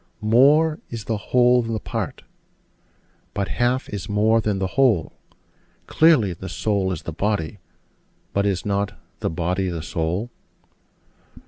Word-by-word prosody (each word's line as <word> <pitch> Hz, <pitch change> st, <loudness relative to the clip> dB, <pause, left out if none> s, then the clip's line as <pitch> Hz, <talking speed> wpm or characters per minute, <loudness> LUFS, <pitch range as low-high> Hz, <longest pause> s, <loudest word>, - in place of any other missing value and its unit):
More 145 Hz, +8 st, +4 dB
is 115 Hz, -2 st, -6 dB
the 110 Hz, -, -2 dB
whole 125 Hz, 0 st, +5 dB
than 115 Hz, -1 st, -3 dB
a -, -, -2 dB
part: -, -, -5 dB, 1.1 s
but 100 Hz, -2 st, -1 dB
half 125 Hz, +2 st, 0 dB
is 100 Hz, -3 st, -6 dB
more 110 Hz, +2 st, +3 dB
than 105 Hz, -2 st, -1 dB
the 95 Hz, -, -1 dB
whole: 125 Hz, -11 st, +2 dB, 0.7 s
Clearly, 150 Hz, -, +4 dB
the 95 Hz, +2 st, -8 dB
soul 95 Hz, +2 st, 0 dB
is 90 Hz, -, -5 dB
the 85 Hz, -, -5 dB
body: 100 Hz, 0 st, -2 dB, 0.7 s
but 100 Hz, 0 st, +1 dB
is 95 Hz, -3 st, -1 dB
not 100 Hz, 0 st, -1 dB, 0.2 s
the -, -, -1 dB
body 90 Hz, +3 st, -1 dB
the 85 Hz, -3 st, -4 dB
soul? 85 Hz, +9 st, -2 dB
105 Hz, 140 wpm, -22 LUFS, 95-120 Hz, 1.1 s, whole